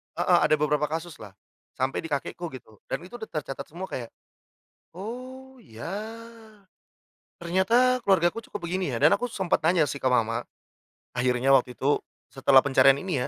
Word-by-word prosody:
eee - - -1
eee, - - +6
ada 155 - +4
beberapa 150 0 +1
kasus 160 +1 -5
lah 105 -3 -11 0.4
sampai 130 +1 -1
di 165 - -5
kakekku 150 +4 -3
gitu, 110 -4 -14
dan - - -3
itu 240 +7 -10
udah 220 - -7
tercatat 140 -3 -5
semua, 175 +4 -9
kayak 120 -3 -4 0.9
"Oh 255 +7 -8
ya 115 - -9 1.5
ternyata 230 +9 +2
keluargaku 190 +1 +2
cukup 170 - -7
begini 180 -3 -2
ya," 115 - -2
dan 150 +5 +5
aku 245 0 -2
sempet 190 -6 0
nanya 165 -1 +3
sih 140 0 -5
ke 130 - +3
mama, 115 -1 +1 0.7
akhirnya 125 +2 +2
waktu 125 -1 +1
itu 145 +2 +2 0.3
setelah 135 0 +5
pencarian 135 0 +5
ini 145 -6 -2
155 Hz, 165 wpm, -26 LUFS, 130-190 Hz, 1.5 s, eee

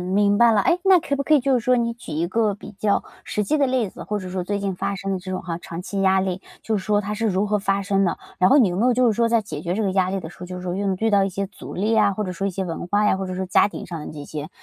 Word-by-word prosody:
明 205 0 +4
白 235 -1 +6
了。 210 -2 +3
诶？ 350 - +2
那 380 -2 +6
可 285 -3 -2
不 280 - -1
可 305 +2 +4
以 - - +5
就 270 +1 +1
是 250 - +3
说 250 0 +3
你 235 -1 0
举 235 -8 -11
一 160 +3 0
个 210 +2 0
比 - - -11
较 205 0 0 0.2
实 210 - -2
际 305 - 0
的 280 -3 +2
例 255 -5 +1
子， - - -10
或 210 - -2
者 185 - -6
说 185 0 -3
最 200 +2 -2
近 195 -2 -2
发 200 - -2
生 195 +1 -4
的 190 - -1
这 185 +1 -9
种， 185 - -3
哈， 170 -1 -4
长 170 0 -7
期 195 +2 -3
压 190 0 +4
力， 190 0 -2 0.2
就 220 - 0
是 195 - -2
说 210 0 +2
它 210 +1 -4
是 225 +2 -1
如 195 0 +1
何 210 0 0
发 195 0 0
生 195 0 +1
的。 175 - 0 0.2
然 185 - +5
后 280 - +6
你 235 -9 +5
有 175 - -3
没 200 - 0
有 - - +4
就 255 0 +3
是 225 - +4
说 230 +2 +1
在 230 -1 +3
解 155 -6 -6
决 175 +2 -2
这 220 - 0
个 195 - 0
压 185 -1 +2
力 195 - -2
的 170 - -7
时 170 - -14
候， 180 - -7
就 180 - -6
是 180 - -8
说 180 -1 -3
遇 195 0 -1
遇 225 0 +1
到 200 -1 +4
一 195 - 0
些 200 +2 -3
阻 195 - -10
力 215 +4 0
呀， 210 -2 +4
或 210 +2 -2
者 185 - -3
说 195 +2 -2
一 - - 0
些 190 +1 -3
文 175 0 -5
化 205 +3 +2
呀， - - +3
或 190 0 -4
者 185 - -4
说 190 - -2
家 185 +2 +4
庭 - - -8
上 170 -2 -6
的 150 - -7
这 145 -2 -8
些， 150 0 -6
195 Hz, 390 characters per minute, -23 LUFS, 185-220 Hz, 0.2 s, 白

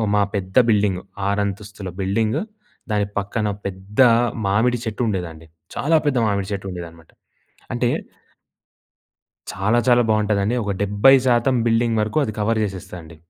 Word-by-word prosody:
మా 105 - +4
పెద్ద 95 +1 -3
building, 100 -4 +2 0.3
ఆరంతస్తుల 100 -1 -3
building, 110 - 0 0.5
దాని 105 -1 +1
పక్కన 105 +2 -1 0.2
పెద్ద 100 +3 -7 0.5
మామిడి 110 +5 +2
చెట్టు 110 +2 -4
ఉండేదండి. 85 -6 -4 0.3
చాలా 160 +3 +2
పెద్ద 135 -3 +1
మామిడి 100 -2 -1
చెట్టు 100 -1 -4
ఉండేదన్నమాట. 85 -2 -10 0.6
అంటే... - - +1 1.6
చాలా 105 +5 +1
చాలా 120 0 +5
బావుంటదండి. 105 +1 +1
ఒక 100 - -2
70% 125 +5 +4
బిల్డింగ్ 115 0 +2
వరకు 105 +7 -2
అది 110 - -2
కవర్ 110 +1 +1
చేసేస్తాదండి. 90 -4 -7
105 Hz, 120 wpm, -21 LUFS, 95-115 Hz, 1.6 s, చాలా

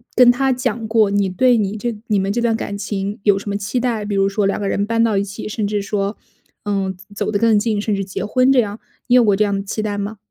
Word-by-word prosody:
跟 250 -1 +7
他 265 +2 +1
讲 245 -3 -2
过， 220 -2 +3
你 200 -1 +1
对 245 +7 +3
你 210 -1 -1
这 235 +1 -3
你 210 - +1
们 195 +1 0
这 240 - -1
段 235 -1 +2
感 205 -2 -4
情 200 +1 -4
有 205 -2 +4
什 195 - -7
么 200 - -2
期 200 +5 -2
待？ 235 -3 -1
比 205 -1 -2
如 195 0 +3
说 200 0 0
两 200 - -1
个 200 - -2
人 200 - 0
搬 230 0 +2
到 220 -3 +2
一 195 - +1
起， 200 +2 -7
甚 215 0 -2
至 205 -1 -1
说， 200 0 -2 0.5
嗯， 195 -2 -1 0.2
走 - - -2
得 205 - +1
更 220 0 +3
近， 215 -1 0
甚 210 +1 -1
至 195 - -2
结 190 0 -5
婚 255 +5 +3
这 260 -2 +5
样， 210 0 -5 0.3
你 245 - +4
有 250 - +7
过 205 -3 +3
这 210 - +2
样 200 - -1
的 195 - -2
期 215 +2 -4
待 205 -1 -2
吗？ 205 +2 -4
210 Hz, 305 characters per minute, -19 LUFS, 200-230 Hz, 0.5 s, 跟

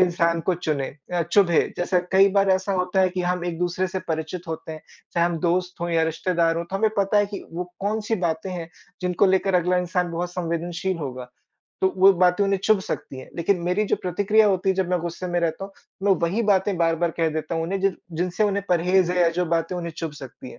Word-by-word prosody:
इंसान 170 -2 +2
को 185 - +4
चुने 150 -5 -2 0.2
अ, 175 -1 +1
चुभे। 175 0 +3 0.2
जैसे 180 +1 +1
कई 195 +1 +6
बार 195 -1 +3
ऐसा 190 +1 +1
होता 185 0 +1
है 185 - +4
कि 180 0 -3
हम 180 0 -1
एक-दूसरे 175 +2 -1
से 190 +1 -3
परिचित 160 +2 -4
होते 160 0 -5
हैं, 155 - -9 0.3
चाहे 170 0 +2
हम 170 -1 -2
दोस्त 180 +1 -1
हो 170 - -2
या 165 -1 +2
रिश्तेदार 165 -1 +1
हों, 170 - -2
तो 190 +3 -4
हमें 220 +2 +2
पता 200 +1 +3
है 205 - +3
कि 200 0 -7
वो 175 +2 -3 0.2
कौन-सी 210 +2 -1
बातें 160 +3 -3
हैं, 170 -2 -6 0.3
जिनको 180 +1 +2
लेकर 190 0 +2
अगला 180 0 +2
इंसान 180 0 -1
बहुत 175 +1 -3
संवेदनशील 175 +1 -2
होगा? 130 -4 -6 0.5
तो 190 - +2
वो 190 +1 +7
बातें 180 +1 +3
उन्हें 195 0 +1
चुभ 215 -2 +4
सकती 135 -7 -5
हैं, 130 - -10
लेकिन 180 +3 +2
मेरी 180 +5 +1
जो - - +1
प्रतिक्रिया 205 +4 +3
होती 190 -1 +1
है 190 - +1
जब 190 -2 -1
मैं 180 - +2
गुस्से 170 +2 -5
में 175 0 0
रहता 170 +2 -1
हूँ, 195 - -10 0.3
मैं 200 0 +4
वही 175 +7 0
बातें 200 -2 +2
बार-बार 165 0 +1
कह 165 -1 +2
देता 155 +1 -3
हूँ, 165 - -1
उन्हें 190 +4 -2
जिन 195 -1 +1 0.2
जिनसे 180 +4 0
उन्हें 200 -1 0
परहेज 180 +1 +3
है, 175 -2 +3
जो 180 +1 0
बातें 165 +2 -1
उन्हें 170 -1 -4
चुभ 165 -3 -4
सकती 130 -3 -10
है। - - -13
180 Hz, 230 wpm, -23 LUFS, 170-190 Hz, 0.5 s, वो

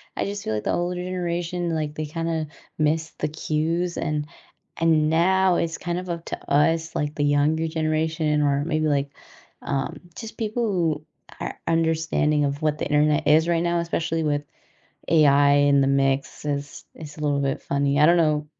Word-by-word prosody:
I - - -1
just 200 0 -5
feel, - - -2
like, 105 - -2
the - - 0
older 180 +1 -2
generation, 175 -1 -2
like, 150 -1 -3
they 155 - -3
kinda 165 +1 -2 0.3
missed 160 +1 -1
the - - 0
cues 160 +3 -2
and 150 -1 -2 0.5
and 160 -2 +3
now 185 +3 +3
it's 165 -1 -1
kind 175 -1 -3
of 185 0 -8
up 170 -1 -4
to - - -4
us, 160 +3 +2
like, 150 +1 -2
the 145 - -1
younger 145 +3 +2
generation 155 -1 0
or 140 0 +1
maybe, 155 -1 0
like, 140 -1 0 0.5
um, 140 -1 -2 0.2
just 225 -2 -8
people 225 +2 -2
who 165 -6 -1 0.3
are - - -5
understanding 160 -2 +1
of 140 +1 -3
what 155 -1 0
the - - -3
internet 150 0 +2
is 155 +2 +5
right 170 -1 +1
now, 170 0 +1
especially 165 -1 -1
with 145 -1 0 0.7
AI 145 -3 +5
in 145 -1 +4
the 135 - +2
mix 135 +1 0
is 140 -1 -4
it's 150 -2 -10
a - - -10
little 145 -2 0
bit 135 -1 -1
funny 140 0 0
I 150 - +7
don't 170 +2 +5
know. 155 -2 +1
155 Hz, 185 wpm, -24 LUFS, 145-170 Hz, 0.7 s, I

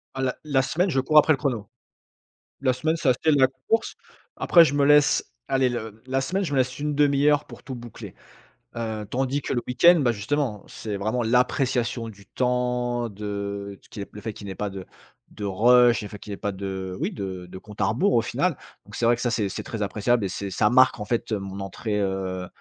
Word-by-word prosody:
Ah 135 - -3
la 130 -1 0
la 140 -3 +2
semaine 170 +8 0
je 135 - +1
cours 150 +4 +2
après 155 +1 +7
le 140 - -1
chrono. 120 -6 -2 0.9
La 130 -2 +2
semaine 155 +6 0
c'est 155 -4 -1
assez 130 +5 +3
la 130 -1 +6 0.2
course, 225 0 +1 0.4
après 170 -1 +6
je 145 - -1
me 145 -1 +3
laisse, 145 - +4
allez 130 -1 +2
le 110 -2 -6
la 135 +1 0
semaine 185 +9 -1
je 150 - -4
me 140 - +2
laisse 130 +1 0
1/2 145 -1 +2
heure 150 0 +4
pour 145 - -13
tout 130 -2 -7
boucler. 120 -2 -10 0.6
Heu, 110 -2 -3
Tandis 135 +3 0
que - - -3
le 120 -2 0
week-end, 170 +7 +5
bah 120 -4 +2
justement, 115 0 -2
c'est 105 -2 -5
vraiment 110 +5 -1
l'appréciation 125 0 +1
du 100 -3 -13
temps, 125 -1 -1
de 100 -1 -5
ce - - -22
qui 105 - -9
n 100 - -5
le 105 - -9
fait 110 0 -5
qu'il 100 - -10
n'y 95 - -5
ait - - -8
pas 105 +1 -3
de 95 -1 -8 0.4
de 105 - -8
rush, 120 +4 +4
le 105 - -6
fait 105 - -9
qu'il - - -10
n'y 100 - -3
ait - - -8
pas 105 - -3
de, 95 -1 -5
oui, 175 +7 0
de 95 - -6
de 90 - -9
compte 105 +2 -13
à - - +3
rebours 125 - +1
au 115 - +4
final. - - 0 0.3
Donc - - -14
c'est 115 - 0
vrai 120 - +4
que 120 - -6
ça 120 - +1
c'est 105 -5 0
c'est - - -6
très 110 -2 -5
appréciable 110 +3 +1
et - - 0
c'est 100 +2 -5
ça 105 +3 +2
marque 130 -1 +5
en 105 - -3
fait 115 0 -2
mon 100 -1 -4
entrée, 105 +2 -3
heu, 95 -2 -2
120 Hz, 235 wpm, -25 LUFS, 100-135 Hz, 0.9 s, après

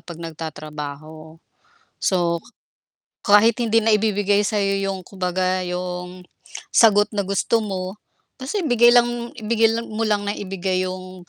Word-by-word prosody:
'pag 170 - -10
nagtatrabaho. 155 -1 -8 0.6
So, 170 -3 +1 0.8
ka 205 0 +6
kahit 225 +1 +4
hindi 225 0 +3
na 225 -1 +3
ibibigay 205 -1 +2
sa'yo 195 -2 0
yung 190 -2 -4
kumbaga 185 -1 -1
yung, 180 0 -5 0.5
sagot 210 -2 +5
na 205 - -1
gusto 200 +4 0
mo, 190 -3 -4 0.5
basta 270 +11 -4
ibigay 240 -4 +5
lang, 240 0 +1
ibigay 225 0 +2
lang 230 - -4
mo 220 - -2
lang 205 -1 0
nang 205 - -1
ibigay 185 -1 -2
yung 185 -1 -9
195 Hz, 140 wpm, -21 LUFS, 180-215 Hz, 0.8 s, ka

